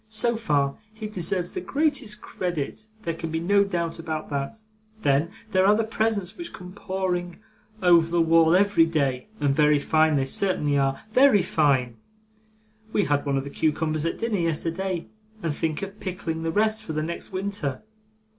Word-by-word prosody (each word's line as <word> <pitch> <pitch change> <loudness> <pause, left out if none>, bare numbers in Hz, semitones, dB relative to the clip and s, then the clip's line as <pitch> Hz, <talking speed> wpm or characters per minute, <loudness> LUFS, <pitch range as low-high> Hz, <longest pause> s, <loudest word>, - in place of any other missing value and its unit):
So 225 +2 +1
far, 145 -11 0 0.2
he 220 0 -6
deserves 185 -3 -2
the 370 - -4
greatest 280 -10 -1
credit; 175 +4 -4 0.2
there 165 - -1
can 165 0 -5
be 160 0 -1
no 200 +4 +3
doubt 170 -4 -2
about 155 -2 -4
that. 140 +11 -4 0.4
Then, 140 +4 +2 0.2
there 185 0 +4
are 205 - +6
the 225 - +1
presents 215 -4 -1
which 345 - -7
come 180 -1 -10
pouring 185 -3 -3 0.5
over 170 -2 +5
the 170 0 +1
wall 165 0 +5
every 200 -3 +4
day, 140 -4 0
and 140 -2 +1
very 150 0 +4
fine 155 +2 +3
they 135 -2 +1
certainly 150 -1 +1
are, 135 -1 0
very 255 -7 +6
fine; 130 -6 +1 0.9
we 205 - +2
had 145 -2 0
one 140 -1 +1
of 135 - -1
the 140 - -7
cucumbers 155 0 0
at - - -3
dinner 230 -4 -1
yesterday, 170 +2 -2 0.4
and 165 -3 0
think 155 +3 -2
of 195 +1 -7
pickling 175 -4 -4
the 165 0 -1
rest 215 +3 +1
for 165 -7 -6
next 155 +5 -4
winter. 190 -8 -3
170 Hz, 175 wpm, -25 LUFS, 155-200 Hz, 0.9 s, are